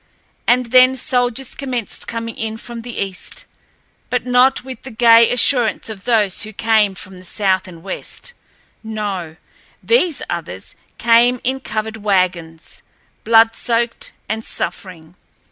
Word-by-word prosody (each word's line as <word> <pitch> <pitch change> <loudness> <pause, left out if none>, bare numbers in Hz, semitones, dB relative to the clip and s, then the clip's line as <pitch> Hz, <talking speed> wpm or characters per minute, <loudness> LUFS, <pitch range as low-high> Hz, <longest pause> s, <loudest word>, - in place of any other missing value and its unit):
And 245 -1 +2
then 255 +1 +6
soldiers 250 -2 -1
commenced 250 -5 -4
coming 230 -1 -5
in 220 0 -4
from 235 0 -8
the 240 0 -8
east, 195 -2 -4 0.6
but - - -1
not 250 +1 +3
with 260 0 -9
the 265 - -9
gay 230 -1 +5
assurance 245 -3 +2
of 200 -3 -9
those 215 -6 +2
who 215 -1 -4
came 215 -2 +2
from 190 0 -9
the - - -14
south 190 0 0
and 170 -2 -12
west—no, 205 - -6 0.5
these 365 - +2
others 155 - -5 0.2
came 235 +2 +4
in 265 +2 -1
covered 220 -2 -4
wagons, 180 -5 -1 0.4
blood 225 0 +5
soaked 235 0 -2 0.2
and 220 +2 -3
suffering. 170 -7 -6
225 Hz, 130 wpm, -18 LUFS, 195-245 Hz, 0.6 s, then